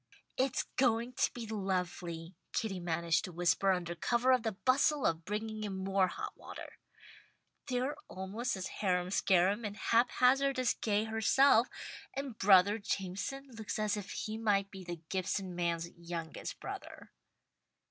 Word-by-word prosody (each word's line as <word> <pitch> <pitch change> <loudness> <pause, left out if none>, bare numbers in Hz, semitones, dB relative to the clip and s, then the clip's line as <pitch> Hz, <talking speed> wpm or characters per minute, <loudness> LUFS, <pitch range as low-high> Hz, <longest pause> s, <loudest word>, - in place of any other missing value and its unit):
"It's 260 0 +1
going 240 -1 +2
to - - +1
be 240 -2 -6
lovely," 180 -5 -3 0.2
Kitty 215 -6 -1
managed 170 -2 +1
to 180 - -7
whisper 175 +3 +2
under 175 -2 -1
cover 240 +8 +2
of 255 -2 +4
the 225 -1 -2
bustle 265 +6 +2
of 165 0 0
bringing 215 +2 -3
in 200 -2 -3
more 190 0 +2
hot - - -6
water. - - -10 0.9
"They're 255 +2 -1
almost 195 +5 -3
as 185 - -4 0.2
harum 180 -2 +1
scarum 195 +3 +3
and 205 -1 -4
hap 235 +2 +3
hazard 270 +2 +4
as 255 -1 +2
Gay 210 -1 0
herself, 225 +3 +4 0.5
and 275 -3 -4
'brother 200 +1 +5
Jameson' 200 +8 -3
looks 225 -2 -5
as 215 -1 +1
if 205 -2 -6
he 220 +1 -4
might 200 -3 +1
be 190 -1 -9
the 175 -2 -6
'Gibson 190 0 -2
man's' 170 -1 -1
youngest 170 -1 -6
brother." - - -8
200 Hz, 150 wpm, -33 LUFS, 180-235 Hz, 0.9 s, brother